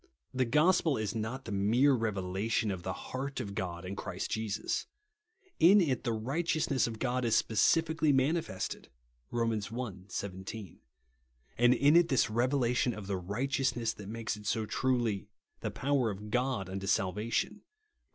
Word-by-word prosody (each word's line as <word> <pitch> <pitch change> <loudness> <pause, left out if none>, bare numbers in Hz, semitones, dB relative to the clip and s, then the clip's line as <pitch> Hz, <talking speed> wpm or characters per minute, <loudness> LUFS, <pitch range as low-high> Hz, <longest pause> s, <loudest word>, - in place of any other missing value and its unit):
The 130 0 +1
gospel 155 +3 +3
is 110 -2 -2
not 115 +4 -4
the - - -6
mere 115 +8 +3
revelation 105 -1 -1
of 95 -2 -4
the 95 - -3 0.2
heart 135 +1 -3
of 100 - -4
God 90 -2 -4
in 95 +2 -5
Christ - - -5
Jesus. 110 -2 -2 0.7
In 185 +6 +7
it 145 -9 +1
the 120 - -1
rigJiteousness 135 +4 0
of 115 -1 -5
God 125 +1 -1
is 115 -2 +2
specially 160 +8 +3
mani 140 +5 +3
fested 95 -10 -5 0.4
(Rom. 115 -1 0
i. 110 +2 -3
17); 95 0 -6 0.8
and 120 +1 +6
it - - -5 0.2
is 175 0 +7
this 135 -6 +3
revela 125 +1 +2
tion 125 -1 +1
of 105 - -7
the 95 -1 -2
righteousness 120 +4 -1
that 105 -1 -10
makes 115 -1 -3
it 105 -1 -9
so 110 +2 0
truly 120 -6 0 0.2
" - - -48
the - - -2
povf 140 -1 0
er 115 - +1
of 105 +1 -7
God 125 -6 0
unto 95 +1 -5
salvation," 105 - 0
(Rom. - - -23
115 Hz, 170 wpm, -31 LUFS, 100-130 Hz, 0.8 s, In